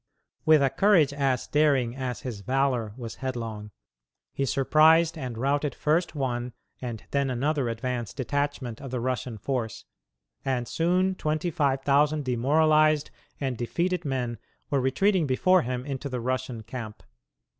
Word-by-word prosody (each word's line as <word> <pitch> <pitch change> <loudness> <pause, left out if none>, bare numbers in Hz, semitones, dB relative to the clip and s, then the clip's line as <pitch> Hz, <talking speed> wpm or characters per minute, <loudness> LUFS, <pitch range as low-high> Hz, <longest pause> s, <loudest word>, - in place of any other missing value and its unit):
With 155 -2 +6
a 135 - +2
courage 160 -3 +4
as 135 -3 0
daring 140 -5 +2
as 130 -4 -4
his 120 -5 -5
valor 130 -1 0
was 115 -3 -7
headlong, 115 -5 -4 0.6
he 135 - -1
surprised 160 +5 +4
and 130 -7 -5
routed 140 +2 0
first 160 +1 0
one 125 -3 -2 0.3
and 120 -4 -5
then 140 -1 +1
another 135 +1 0
advance 120 -1 -3
detachment 140 -2 -3
of 135 - -7
the 125 0 -2
Russian 125 -1 -2
force, 115 0 -3 0.6
and 125 -3 -1
soon 180 +3 +1
twenty 155 0 -2
five 140 -4 0
thousand 145 +1 +2
demoralized 155 +4 +3 0.3
and 135 -3 -2
defeated 170 +9 -1
men 125 -5 -2 0.3
were 140 -2 +2
retreating 175 +6 +2
before 185 +8 +4
him 125 +1 -3
into 140 0 -4
the 125 -1 -3
Russian 125 -1 -3
camp. 115 -2 -7
135 Hz, 145 wpm, -27 LUFS, 125-150 Hz, 0.6 s, With